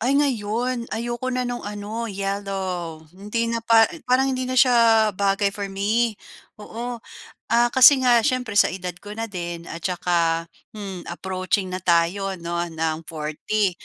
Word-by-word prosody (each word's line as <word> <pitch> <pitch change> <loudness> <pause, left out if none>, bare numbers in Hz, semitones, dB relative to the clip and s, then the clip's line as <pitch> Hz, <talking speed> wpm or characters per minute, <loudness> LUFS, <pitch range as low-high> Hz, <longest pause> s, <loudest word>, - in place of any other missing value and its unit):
Ay, 265 +4 +2
ngayon, 240 -2 0
ayoko 240 +3 -3
na 255 0 -1
no'ng 245 0 -3
ano, 210 +3 -5
yellow. 190 -5 -4
Hindi 230 +5 -2
na 230 - -1
pa 225 -1 +6 0.2
parang 265 +1 +3
hindi 255 0 -2
na 255 - -2
sya 230 -4 +5
bagay 200 +1 +1
for 200 -1 -5
me, 210 +3 0 0.4
oo. 235 +3 -6 0.5
Ah, 235 +1 +3
kasi 265 +2 +8
nga 240 -1 +5
syempre, 235 -3 +1
sa - - +6
edad 180 0 -4
ko 205 +1 -9
na 225 - -3
din 175 -2 -5
at 170 - -6
tsaka, 170 -2 0 0.3
hmm 195 -4 -7
approaching 185 +2 -2
na 185 - -3
tayo 180 +3 +1
'no, 170 0 -4
ng 160 -1 -3
40, 165 +6 -1
205 Hz, 155 wpm, -23 LUFS, 185-235 Hz, 0.5 s, kasi